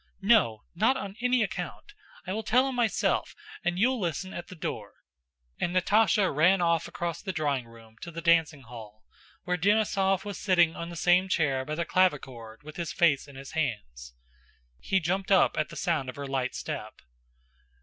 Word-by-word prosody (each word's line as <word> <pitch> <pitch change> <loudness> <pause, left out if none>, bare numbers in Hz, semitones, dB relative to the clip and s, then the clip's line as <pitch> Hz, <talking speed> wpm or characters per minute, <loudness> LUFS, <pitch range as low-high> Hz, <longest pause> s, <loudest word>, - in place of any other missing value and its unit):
"No, 195 - +3
not 220 +9 +2
on 195 0 -6
any 250 -1 +3
account! 215 - -6 0.3
I 185 - -3
will 220 - -2
tell 255 +4 +3
him 265 - -3
myself, 240 -3 0 0.3
and 175 - -1
you'll 250 +5 +2
listen 185 +1 -3
at 175 - -7
the 185 - -10
door," 160 - -5 0.7
and 175 +1 -1
Natásha 205 -1 +3
ran 180 +6 +4
across 170 0 -1
the 195 - -4
drawing 145 -7 -1
room 115 -1 -17
to - - -7
the 170 0 -7
dancing 165 -4 +2
hall, 110 -3 -12 0.4
where 180 0 -1
Denísov 195 -1 +2
was 205 -1 -6
sitting 175 -4 +3
on 170 - -6
the 170 - -8
same 180 +3 +3
chair 140 -7 +1
by 155 +2 -4
the 170 +1 -2
clavichord 130 -11 -1
with 155 0 -11
his 170 -1 -3
face 155 -4 +2
in 140 - -14
his 135 0 -9
hands. 60 - -4 0.6
He 190 - +1
jumped 190 +3 -2
up 190 - +4
at 155 - -1
the - - -10
sound 165 -7 -1
of 125 - -7
her 140 - -6
light 135 -2 -2
step. 110 0 -6
170 Hz, 180 wpm, -28 LUFS, 140-195 Hz, 0.7 s, ran